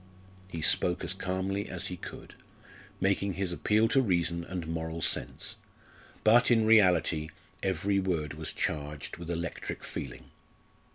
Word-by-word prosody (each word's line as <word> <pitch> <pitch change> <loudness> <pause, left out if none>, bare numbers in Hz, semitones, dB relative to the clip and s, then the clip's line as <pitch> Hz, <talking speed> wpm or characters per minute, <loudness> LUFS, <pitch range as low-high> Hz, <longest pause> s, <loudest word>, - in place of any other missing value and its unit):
He 85 -4 -5
spoke 90 +3 +4
as 90 +1 +4
calmly 95 +1 -2
as 90 0 -1
he 90 - -4
could, - - -10 0.7
making 100 0 +1
his 90 0 -1
appeal 110 +5 +2
to 135 - +4
reason 85 -6 0
and 90 -1 -5
moral 80 0 -4
sense; - - -1 0.7
but, 120 +3 +6
in 115 -2 +4
reality, 90 -7 +4 0.3
every 95 +2 +1
word 85 -6 -1
was - - -4
charged 75 -1 -3
with 85 -1 -8
electric 85 -1 -4
feeling. - - -7
90 Hz, 135 wpm, -30 LUFS, 85-100 Hz, 0.7 s, but